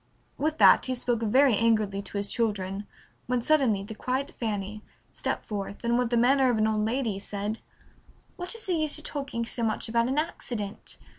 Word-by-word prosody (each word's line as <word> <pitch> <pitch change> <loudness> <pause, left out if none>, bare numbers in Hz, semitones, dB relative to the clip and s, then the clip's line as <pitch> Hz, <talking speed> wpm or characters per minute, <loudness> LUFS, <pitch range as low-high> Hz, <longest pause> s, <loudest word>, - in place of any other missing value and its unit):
With 310 +2 -1
that - - +6
he 255 - -1
spoke 240 -2 -1
very 255 +3 +4
angrily 215 -3 +2
to 200 +1 -7
his 200 - 0
children, 205 -3 -2 0.4
when 250 0 +1
suddenly 250 -9 +3
the 215 +2 -7
quiet 260 +5 -2
Fanny 210 -2 -3 0.3
stepped - - -3
forth, 200 0 -5
and 235 0 +2
with 245 -1 +1
the 240 - +1
manner 260 +2 +4
of 240 - +2
an 215 - +3
old 215 -1 +1
lady 225 -3 -1
said, 205 +2 -4 0.8
"What 360 +4 -3
is 455 - -5
the 370 - 0
use 310 -3 +2
of - - -3
talking 275 -5 -3
so 235 - -2
much 225 0 0
about 235 +1 +2
an 265 +3 -1
accident? 235 -9 -3
230 Hz, 195 wpm, -27 LUFS, 210-260 Hz, 0.8 s, that